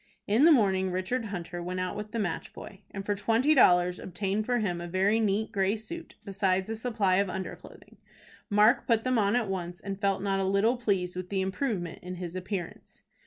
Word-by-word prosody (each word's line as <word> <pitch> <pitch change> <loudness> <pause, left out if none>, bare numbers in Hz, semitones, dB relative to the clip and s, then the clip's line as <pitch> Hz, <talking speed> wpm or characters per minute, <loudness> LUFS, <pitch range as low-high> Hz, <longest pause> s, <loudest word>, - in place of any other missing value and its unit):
In 225 +8 +4
the 335 - +8
morning 190 -8 +3
Richard 185 +7 -2
Hunter 175 -3 -5
went 180 +1 -4
out 185 0 -2
with 210 0 -6
the 235 - -3
match 190 -7 -3
boy, 195 - -10
and 195 -1 -7
for 205 - +1
twenty 230 +8 +2
dollars 180 -8 +4
obtained 195 +3 -2
for 245 -1 +2
him 180 -6 -1
a 175 - -5
very 190 +5 +2
neat 215 0 0
gray 195 +2 +1
suit, 335 +9 -9
besides 190 -2 0
a - - -2
supply 220 -5 +1
of 200 -1 +1
under 185 +1 -4
clothing. - - -16 0.5
Mark 210 +4 +4
put 230 -2 +2
them 255 -2 +1
on 205 +2 +2
at 240 -3 +1
once, 180 -2 -4
and 195 0 -6
felt 195 -1 +1
not 195 -1 0
a - - 0
little 200 +5 +2
pleased 195 -7 -1
with 180 0 -5
the 195 -1 0
improvement 190 - -2
in 180 0 -6
his 175 -1 -6
appearance. 185 -1 -6
195 Hz, 215 wpm, -28 LUFS, 185-220 Hz, 0.5 s, the